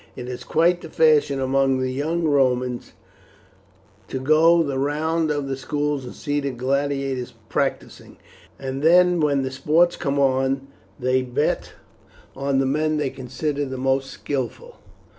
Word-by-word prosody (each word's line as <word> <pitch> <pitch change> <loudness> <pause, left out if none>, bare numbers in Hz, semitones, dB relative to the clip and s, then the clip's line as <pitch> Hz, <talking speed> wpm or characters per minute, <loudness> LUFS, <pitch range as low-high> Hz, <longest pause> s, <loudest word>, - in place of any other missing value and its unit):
It 125 -1 -7
is 125 -1 -6
quite 170 +2 +2
the 165 - -9
fashion 150 -3 +3
among 135 0 +2
the 130 0 -1
young 160 +6 -1
Romans 130 -4 +1 1.1
to - - -4
go 160 +5 +4
the 140 -3 -2
round 155 +3 0
of 145 -2 -1
the 135 - -2
schools 145 0 -2
and 125 - -9
see 145 -1 -2
the 140 -1 -2
gladiators 135 0 -2
practising, - - -3 0.4
and 135 0 -5
then 180 +2 +5
when 145 -3 +2
the 130 - -3
sports 160 +6 +2
come 140 0 -2
on 135 0 +1 0.3
they 130 +1 +1
bet 125 -1 -1 0.6
on 140 0 -1
the 135 - +2
men 155 +3 0
they 145 -3 -1
consider 140 +3 -3
the 130 -1 -5
most 135 +1 0
skilful." 145 - -5
140 Hz, 150 wpm, -23 LUFS, 130-155 Hz, 1.1 s, then